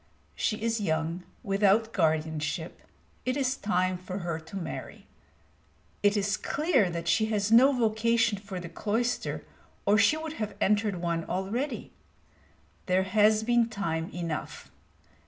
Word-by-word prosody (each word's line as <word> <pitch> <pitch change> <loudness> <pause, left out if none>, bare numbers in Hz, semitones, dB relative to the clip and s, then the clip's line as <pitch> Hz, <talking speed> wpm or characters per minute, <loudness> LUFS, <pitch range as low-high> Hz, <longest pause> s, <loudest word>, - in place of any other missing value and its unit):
She 210 - -1
is 230 -1 0
young, 160 -1 -1 0.2
without 205 +2 +2
guardianship; 160 -1 -1 0.4
it 255 +2 -1
is 265 -1 +1
time 185 -6 0
for 185 +1 -6
her 165 -2 -2
to 160 +4 -12
marry. 190 - -6 1.0
It 205 +1 +3
is 200 0 +1
clear 280 - +1
that 170 -1 -4
she 220 +5 +3
has 210 -1 0
no 255 +5 +7
vocation 230 -2 +2
for 195 -2 -6
the 175 - -7
cloister, 225 +8 -2 0.4
or 205 +2 +4
she 220 +8 +4
would 315 0 -5
have 210 -2 -3
entered 210 0 +2
one 170 -1 -1
already. 215 +10 -3 1.0
There 185 0 +3
has 215 +3 +3
been 235 0 +3
time 165 -6 -2
enough. 170 -3 -5
205 Hz, 140 wpm, -28 LUFS, 175-225 Hz, 1.0 s, no